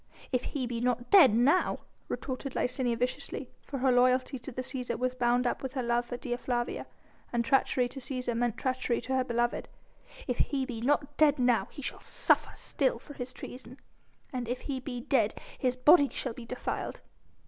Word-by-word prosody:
"If 250 Hz, -1 st, 0 dB
he 270 Hz, -3 st, -2 dB
be 240 Hz, -1 st, -3 dB
not 245 Hz, 0 st, -1 dB
dead 305 Hz, -, +8 dB
now," 275 Hz, +10 st, +3 dB, 0.3 s
retorted 265 Hz, 0 st, -4 dB
Licinia 250 Hz, -2 st, 0 dB
viciously, 250 Hz, +1 st, -3 dB
for 275 Hz, -, -6 dB
her 260 Hz, 0 st, +3 dB
loyalty 255 Hz, +1 st, +3 dB
to 255 Hz, -, -7 dB
the 255 Hz, +1 st, -4 dB
Cæsar 250 Hz, -1 st, -1 dB
was 255 Hz, 0 st, 0 dB
bound 245 Hz, 0 st, +2 dB
up 240 Hz, -, 0 dB
with 265 Hz, -1 st, -4 dB
her 260 Hz, -3 st, -2 dB
love 240 Hz, 0 st, +1 dB
for 245 Hz, -, -4 dB
Dea 240 Hz, -1 st, -3 dB
Flavia, 240 Hz, -1 st, -2 dB, 0.4 s
and 235 Hz, -1 st, 0 dB
treachery 255 Hz, -1 st, +3 dB
to 270 Hz, -, -8 dB
Cæsar 250 Hz, -2 st, -3 dB
meant 240 Hz, -1 st, 0 dB
treachery 255 Hz, -2 st, 0 dB
to 260 Hz, +2 st, -2 dB
her 260 Hz, -, +3 dB
beloved, 240 Hz, -1 st, -1 dB, 0.6 s
"If 250 Hz, -2 st, -1 dB
he 270 Hz, -2 st, +1 dB
be 240 Hz, -4 st, -5 dB
not 290 Hz, +3 st, +1 dB
dead 300 Hz, -1 st, +5 dB
now, 245 Hz, -6 st, +3 dB
he 285 Hz, -, -9 dB
shall -, -, -4 dB
still -, -, +3 dB
suffer -, -, -2 dB
for 290 Hz, -, -12 dB
his 250 Hz, -2 st, -6 dB
treason: 250 Hz, 0 st, -10 dB, 0.6 s
and 250 Hz, -2 st, -3 dB
if 245 Hz, +2 st, -3 dB
he 270 Hz, -2 st, -3 dB
be 250 Hz, -2 st, -5 dB
dead 230 Hz, -4 st, +1 dB, 0.2 s
his 250 Hz, -1 st, +1 dB
body 285 Hz, +3 st, +6 dB
shall 255 Hz, -, -3 dB
be 230 Hz, 0 st, -10 dB
defiled." 250 Hz, -, -4 dB
250 Hz, 190 wpm, -30 LUFS, 240-265 Hz, 0.6 s, dead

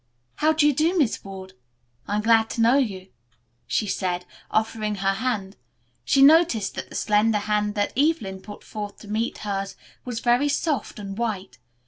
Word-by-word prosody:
"How 310 Hz, +1 st, +3 dB
do 310 Hz, -1 st, +2 dB
you 295 Hz, -, +5 dB
do, 325 Hz, +7 st, +1 dB
Miss 275 Hz, -9 st, +1 dB
Ward? 190 Hz, -1 st, -9 dB, 0.5 s
I 205 Hz, -, -1 dB
am 210 Hz, -, 0 dB
glad 225 Hz, 0 st, +4 dB
to 230 Hz, -, -2 dB
know 235 Hz, +3 st, +5 dB
you," 195 Hz, -7 st, -3 dB, 0.6 s
she 215 Hz, -, 0 dB
said, 180 Hz, -3 st, -2 dB, 0.2 s
offering 215 Hz, -1 st, -1 dB
her 195 Hz, 0 st, +1 dB
hand. 200 Hz, -3 st, -3 dB, 0.5 s
She 270 Hz, -, +4 dB
noticed 290 Hz, -, +5 dB
that -, -, -6 dB
the -, -, -11 dB
slender 210 Hz, +1 st, +2 dB
hand 210 Hz, 0 st, -1 dB
that 205 Hz, -1 st, 0 dB
Evelyn 245 Hz, -10 st, 0 dB
put 205 Hz, +1 st, -11 dB
forth 210 Hz, -2 st, -7 dB
to 215 Hz, -, -12 dB
meet 220 Hz, +3 st, -2 dB
hers 195 Hz, -1 st, -3 dB, 0.3 s
was 245 Hz, -3 st, -4 dB
very 245 Hz, +5 st, +2 dB
soft 290 Hz, 0 st, -1 dB
and 195 Hz, -2 st, -6 dB
white. 210 Hz, -4 st, -4 dB
215 Hz, 175 wpm, -24 LUFS, 200-250 Hz, 0.6 s, you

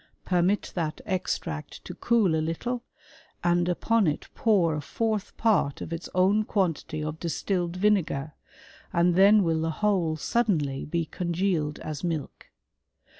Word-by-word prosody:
Permit 180 Hz, +3 st, +1 dB
that 160 Hz, -3 st, -2 dB
extract 170 Hz, -5 st, -3 dB
to -, -, -6 dB
cool 225 Hz, -8 st, +2 dB
a 160 Hz, -, +1 dB
little, 235 Hz, +10 st, -2 dB, 0.6 s
and 175 Hz, 0 st, +2 dB
upon 220 Hz, +3 st, +2 dB
it 150 Hz, -, -2 dB
pour 190 Hz, -8 st, +2 dB
a 150 Hz, -, -2 dB
fourth 215 Hz, +5 st, -2 dB
part 210 Hz, -11 st, +2 dB
of 165 Hz, -, -5 dB
its 165 Hz, -, -6 dB
own 195 Hz, +4 st, +4 dB
quantity 165 Hz, -6 st, -1 dB
of 155 Hz, +1 st, -4 dB
distilled 175 Hz, +1 st, -2 dB
vinegar, 180 Hz, -7 st, +1 dB, 0.6 s
and 175 Hz, 0 st, +3 dB
then 200 Hz, +3 st, +6 dB
will 165 Hz, -2 st, +1 dB
the 165 Hz, -, 0 dB
whole 175 Hz, -3 st, 0 dB
suddenly 155 Hz, -, 0 dB
be 170 Hz, +2 st, -1 dB
congealed 170 Hz, -3 st, -1 dB
as 155 Hz, 0 st, -5 dB
milk. 165 Hz, -5 st, -4 dB
175 Hz, 140 wpm, -27 LUFS, 160-200 Hz, 0.6 s, then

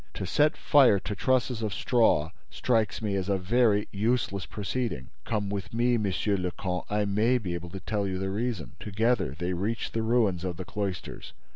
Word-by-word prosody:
To -, -, -3 dB
set 150 Hz, -, +2 dB
fire 135 Hz, -8 st, +5 dB
to 105 Hz, -, -4 dB
trusses 125 Hz, +2 st, +1 dB
of 105 Hz, -2 st, -2 dB
straw 110 Hz, -11 st, +2 dB, 0.2 s
strikes 110 Hz, -3 st, 0 dB
me 105 Hz, -2 st, 0 dB
as 95 Hz, 0 st, -1 dB
a 100 Hz, -, +2 dB
very 105 Hz, +2 st, +2 dB
useless 100 Hz, -4 st, 0 dB
proceeding." 105 Hz, -, -3 dB
"Come 105 Hz, -3 st, -1 dB
with 100 Hz, +2 st, -4 dB
me, 120 Hz, +1 st, +3 dB
Monsieur 100 Hz, 0 st, 0 dB
le 90 Hz, -1 st, -1 dB
Comte: 90 Hz, 0 st, -4 dB
I 105 Hz, 0 st, +1 dB
may 110 Hz, +5 st, +2 dB
be 95 Hz, -7 st, -4 dB
able 85 Hz, 0 st, -5 dB
to 95 Hz, +2 st, -7 dB
tell 100 Hz, 0 st, -2 dB
you 95 Hz, -1 st, -2 dB
the 95 Hz, +1 st, -2 dB
reason." 110 Hz, -4 st, -2 dB
Together 105 Hz, -, 0 dB
they 90 Hz, +1 st, -2 dB
reached 105 Hz, +6 st, -2 dB
the 115 Hz, -, 0 dB
ruins 110 Hz, -6 st, +2 dB
of 90 Hz, -2 st, -3 dB
the 95 Hz, -, -5 dB
cloisters. 100 Hz, -4 st, -5 dB
105 Hz, 190 wpm, -28 LUFS, 95-115 Hz, 0.2 s, fire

